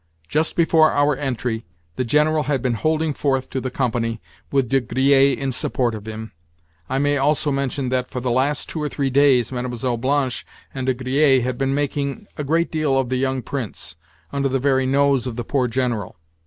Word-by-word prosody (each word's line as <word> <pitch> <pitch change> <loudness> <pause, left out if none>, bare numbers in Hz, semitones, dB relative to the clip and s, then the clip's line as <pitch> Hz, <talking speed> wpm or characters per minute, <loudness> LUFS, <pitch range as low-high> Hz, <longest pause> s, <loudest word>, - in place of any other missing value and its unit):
Just 155 - 0
before 160 -2 +4
our 145 0 +3
entry, 120 -5 -3 0.3
the 130 - -1
General 150 +4 +2
had 140 -1 -1
been 125 -2 +1
holding 155 +5 0
forth 135 -2 -1
to 130 - -2
the 130 - -3
company, 120 -3 -1 0.3
with 135 -3 +2
De 135 +1 +3
Griers 135 +2 +3
in 135 -1 -2
support 120 0 0
of 110 0 -8
him. 110 0 -6 0.6
I 130 - 0
may 145 +1 +2
also 145 +1 +2
mention 135 -1 -1
that, 125 0 -1
for 125 - -4
the 125 0 -1
last 135 +4 +1
two 160 - -4
or 150 - -1
three 140 -2 -1
days, 135 -4 +4
Mlle. 125 -1 -2
Blanche 130 +1 0 0.3
and 130 -1 -4
De 130 - +2
Griers 130 +1 +3
had 125 0 -3
been 135 0 +1
making 140 +4 -2
a 150 - -4
great 165 +4 +1
deal 155 -4 +1
of 130 -2 0
the 130 - 0
young 130 -1 -1
Prince, 125 - -5 0.4
under 140 -1 0
the 135 - +1
very 130 0 +2
nose 140 -1 +2
of 120 - -4
the 120 - -3
poor 130 0 0
General. 120 -5 -2
135 Hz, 200 wpm, -21 LUFS, 125-145 Hz, 0.6 s, before